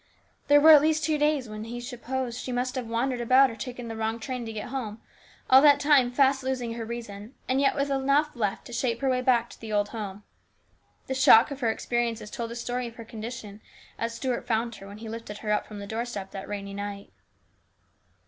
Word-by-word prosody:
There 290 Hz, 0 st, +7 dB
were 315 Hz, +2 st, +8 dB
at 300 Hz, -2 st, +9 dB
least 315 Hz, +1 st, +1 dB
two 310 Hz, -2 st, +1 dB
days 295 Hz, -4 st, +1 dB
when 215 Hz, 0 st, -7 dB
he 240 Hz, +1 st, -6 dB
supposed 245 Hz, 0 st, -4 dB
she 255 Hz, -, -5 dB
must 250 Hz, +1 st, -1 dB
have 255 Hz, -3 st, -4 dB
wandered 240 Hz, +2 st, -1 dB
about 255 Hz, +2 st, +5 dB
or -, -, -8 dB
taken 245 Hz, +1 st, -7 dB
the 225 Hz, -, -5 dB
wrong 220 Hz, +1 st, -2 dB
train 250 Hz, -1 st, -5 dB
to -, -, -5 dB
get 215 Hz, 0 st, -6 dB
home, 230 Hz, -5 st, -5 dB, 0.5 s
all 260 Hz, +1 st, +8 dB
that 285 Hz, -1 st, +6 dB
time 285 Hz, -4 st, +4 dB
fast 270 Hz, +1 st, +3 dB
losing 255 Hz, -3 st, -2 dB
her 230 Hz, 0 st, -5 dB
reason, 225 Hz, 0 st, -7 dB
and 260 Hz, +2 st, +1 dB
yet 275 Hz, -, +3 dB
with 280 Hz, 0 st, -1 dB
enough 275 Hz, +2 st, +1 dB
left 210 Hz, -5 st, -2 dB
to 240 Hz, -, -10 dB
shape 235 Hz, 0 st, -1 dB
her 270 Hz, -, +1 dB
way 255 Hz, 0 st, +1 dB
back 240 Hz, -2 st, +2 dB
to -, -, -15 dB
the 220 Hz, -1 st, -7 dB
old 205 Hz, -1 st, +1 dB
home. 205 Hz, -3 st, -6 dB, 0.8 s
The 265 Hz, -, -3 dB
shock 260 Hz, -1 st, +6 dB
of 280 Hz, -, -5 dB
her 235 Hz, -4 st, +1 dB
experiences 230 Hz, -2 st, -2 dB
told 230 Hz, -1 st, -4 dB
the 235 Hz, -, -7 dB
story 245 Hz, +1 st, -3 dB
of 230 Hz, -, -11 dB
her 230 Hz, -, -9 dB
condition 220 Hz, -2 st, -8 dB, 0.4 s
as 230 Hz, 0 st, -2 dB
Stuart 250 Hz, 0 st, -3 dB
found 230 Hz, 0 st, 0 dB
her 195 Hz, -, -11 dB
when 200 Hz, +1 st, -10 dB
he 225 Hz, +1 st, -9 dB
lifted 220 Hz, -2 st, -7 dB
her 210 Hz, -, 0 dB
up 210 Hz, -, 0 dB
from 210 Hz, -, -9 dB
the 200 Hz, -, -6 dB
doorstep 220 Hz, -2 st, -5 dB
that 195 Hz, -, -7 dB
rainy 200 Hz, -1 st, -5 dB
night. 200 Hz, 0 st, -6 dB
240 Hz, 225 wpm, -27 LUFS, 220-265 Hz, 0.8 s, at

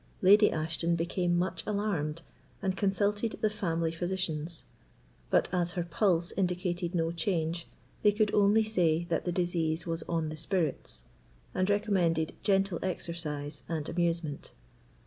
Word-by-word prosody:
Lady 205 Hz, +3 st, +7 dB
Ashton 160 Hz, +2 st, 0 dB
became 175 Hz, +1 st, 0 dB
much 180 Hz, +2 st, -1 dB
alarmed 175 Hz, -7 st, -1 dB, 0.4 s
and 190 Hz, -2 st, -1 dB
consulted 205 Hz, +3 st, +1 dB
the 215 Hz, -, +2 dB
family 165 Hz, -6 st, -1 dB
physicians. 170 Hz, -2 st, -2 dB, 0.7 s
But -, -, +3 dB
as 175 Hz, -1 st, 0 dB
her 175 Hz, -, -1 dB
pulse 175 Hz, -1 st, +1 dB
indicated 180 Hz, -1 st, -1 dB
no 165 Hz, -1 st, +1 dB
change, 170 Hz, -1 st, -1 dB, 0.3 s
they 210 Hz, -, +5 dB
could 210 Hz, 0 st, +1 dB
only 210 Hz, +2 st, +5 dB
say 175 Hz, -6 st, +2 dB
that -, -, 0 dB
the 175 Hz, -, 0 dB
disease 170 Hz, -2 st, 0 dB
was 165 Hz, -1 st, -2 dB
on 165 Hz, -2 st, 0 dB
the 155 Hz, -, -6 dB
spirits, 155 Hz, -, 0 dB, 0.5 s
and 185 Hz, +1 st, +1 dB
recommended 180 Hz, -6 st, +1 dB
gentle 195 Hz, -3 st, +2 dB
exercise 165 Hz, -5 st, -4 dB
and 160 Hz, -3 st, -2 dB
amusement. 170 Hz, -4 st, -1 dB
175 Hz, 135 wpm, -30 LUFS, 165-195 Hz, 0.7 s, Lady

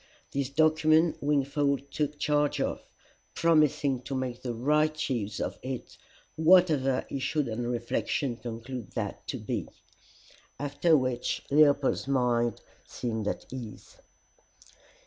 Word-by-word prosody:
This 135 Hz, -1 st, -1 dB
document 155 Hz, +2 st, +3 dB
Wingfold 140 Hz, -1 st, 0 dB
took 150 Hz, 0 st, -2 dB
charge 145 Hz, 0 st, +1 dB
of, -, -, -1 dB, 0.5 s
promising 150 Hz, -5 st, +3 dB
to 135 Hz, +2 st, -5 dB
make 130 Hz, -2 st, -3 dB
the 120 Hz, -2 st, -4 dB
right 150 Hz, +5 st, +2 dB
use 105 Hz, -4 st, -2 dB
of -, -, -3 dB
it, 130 Hz, -1 st, -6 dB, 0.4 s
whatever 155 Hz, -6 st, +4 dB
he 140 Hz, -, -4 dB
should 140 Hz, +1 st, 0 dB
on 120 Hz, +1 st, -3 dB
reflection 120 Hz, +2 st, -1 dB
conclude 120 Hz, -1 st, -7 dB
that -, -, -4 dB
to -, -, -3 dB
be; -, -, -3 dB, 0.9 s
after 145 Hz, +3 st, +3 dB
which 130 Hz, -2 st, -1 dB
Leopold's 145 Hz, -2 st, +4 dB
mind 120 Hz, -4 st, +1 dB, 0.3 s
seemed 110 Hz, -3 st, -3 dB
at -, -, -3 dB
ease. 120 Hz, -5 st, -9 dB
135 Hz, 120 wpm, -28 LUFS, 120-150 Hz, 0.9 s, whatever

